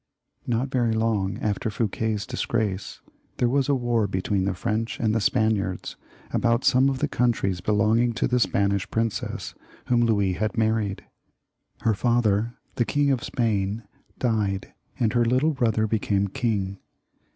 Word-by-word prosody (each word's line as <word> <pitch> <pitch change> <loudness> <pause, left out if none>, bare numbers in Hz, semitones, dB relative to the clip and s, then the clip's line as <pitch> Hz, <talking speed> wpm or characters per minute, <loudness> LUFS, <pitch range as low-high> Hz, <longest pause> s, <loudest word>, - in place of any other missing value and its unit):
Not 120 +3 0
very 120 -4 +1
long 110 -3 0
after 105 +1 -1
Fouquet's 110 -1 -1
disgrace, 105 -4 -2 0.4
there 120 - +2
was 135 +2 +1
a 140 - +4
war 120 -4 +1
between 95 0 -1
the 100 -1 -1
French 115 +3 -2
and 110 -2 +1
the 115 - +1
Spaniards 100 -3 0 0.4
about 115 +1 +2
some 130 +2 +5
of 135 - -1
the 145 - 0
countries 115 -9 0
belonging 110 +4 +2
to - - 0
the 125 0 +1
Spanish 100 -3 +1
princess 115 -1 -2 0.4
whom 120 -1 +4
Louis 100 -5 +2
had 110 +5 -2
married. 110 -3 0 0.8
Her 110 - +2
father 115 0 +1 0.2
the 120 - +3
King 145 +2 +2
of 130 -3 0
Spain 110 -2 -1 0.3
died, 105 -5 -1 0.3
and 115 -2 +1
her 120 -1 +3
little 130 +7 +2
brother 115 -4 +1
became 100 -2 0
king. 100 -5 -2
110 Hz, 150 wpm, -25 LUFS, 100-120 Hz, 0.8 s, some